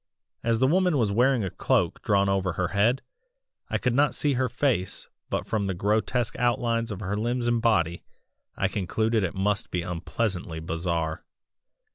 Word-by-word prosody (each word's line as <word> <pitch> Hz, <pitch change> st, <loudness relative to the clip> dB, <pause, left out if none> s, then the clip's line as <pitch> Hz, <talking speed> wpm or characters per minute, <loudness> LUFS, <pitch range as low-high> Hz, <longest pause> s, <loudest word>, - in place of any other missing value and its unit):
As 115 Hz, -1 st, +1 dB
the 130 Hz, -, +4 dB
woman 180 Hz, +2 st, +3 dB
was 110 Hz, -5 st, +2 dB
wearing 125 Hz, +2 st, +3 dB
a 95 Hz, -, -3 dB
cloak -, -, 0 dB
drawn 100 Hz, -1 st, +2 dB
over 95 Hz, -2 st, +1 dB
her 90 Hz, 0 st, -1 dB
head, 115 Hz, +6 st, +2 dB, 0.7 s
I -, -, +1 dB
could 125 Hz, -, 0 dB
not 145 Hz, +3 st, +3 dB
see 145 Hz, -2 st, +2 dB
her 130 Hz, -1 st, 0 dB
face 120 Hz, -6 st, -1 dB, 0.2 s
but -, -, -2 dB
from 105 Hz, -3 st, -1 dB
the 95 Hz, -, -2 dB
grotesque 110 Hz, +5 st, 0 dB
outlines 115 Hz, -1 st, +1 dB
of 105 Hz, -2 st, -5 dB
her 100 Hz, 0 st, -2 dB
limbs 120 Hz, +3 st, -1 dB
and 120 Hz, -1 st, +2 dB
body, 85 Hz, -8 st, +1 dB, 0.5 s
I -, -, +2 dB
concluded 110 Hz, +3 st, 0 dB
it 90 Hz, -, -2 dB
must 100 Hz, +2 st, 0 dB
be 90 Hz, -1 st, -2 dB
unpleasantly 90 Hz, 0 st, -3 dB
bizarre. 80 Hz, 0 st, -2 dB
105 Hz, 170 wpm, -26 LUFS, 95-120 Hz, 0.7 s, the